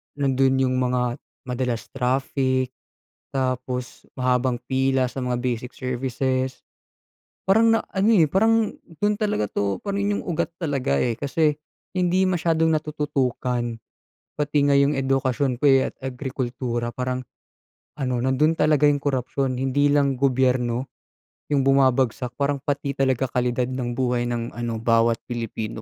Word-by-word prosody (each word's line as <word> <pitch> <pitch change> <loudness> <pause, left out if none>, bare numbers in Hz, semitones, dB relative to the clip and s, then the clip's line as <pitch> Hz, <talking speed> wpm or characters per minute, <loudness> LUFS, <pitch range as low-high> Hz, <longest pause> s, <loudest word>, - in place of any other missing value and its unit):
nandun 135 -1 +2
yung 130 0 +1
mga 125 -1 0 0.2
madalas 125 -2 -3
traffic, 130 0 0 0.6
tapos 125 -1 -3
mahabang 125 0 +1
pila 130 0 +1
sa - - -5
mga 125 -1 -1
basic 125 0 -3
services. 130 +1 -2 0.8
Parang 225 +4 +5
na-ano, 200 +2 0
eh, 170 -6 +5
parang 220 +6 +2 0.2
dun 205 0 +2
talaga 210 - 0
'to 100 -1 -1
pa 200 - -4
rin 200 +1 0
yung - - -4
ugat 170 -3 -1
talaga, 140 - 0
eh, 120 - +1
kasi 150 +4 +1 0.4
hindi 185 +1 +2
masyadong 165 -3 +2
natututukan. 130 -6 -1 0.6
Pati 150 0 0
nga 140 - +4
yung 140 +1 +3
edukasyon 135 -1 0
ko, 145 - +1
eh, 135 -1 +4
at - - -29
agrikultura 125 -2 -3
parang 125 0 -3 0.7
ano, 130 -4 -2
nandun 130 +6 +2
talaga 150 -1 +4
yung 145 - +1
korapsiyon, 135 -1 -1
hindi 140 +2 +2
lang 140 -3 +2
gobyerno 130 -1 +1 0.6
yung 140 -2 +2
bumabagsak, 130 -2 +2
parang 140 0 0
pati 140 -1 -2
talaga 135 -1 +1
kalidad 125 0 0
ng 120 -2 -3
buhay 125 -2 +1
ng 120 -1 -3
ano 120 -1 -3
bawat 115 0 +3
Pilipino 115 -2 -4
130 Hz, 135 wpm, -23 LUFS, 125-145 Hz, 0.8 s, Parang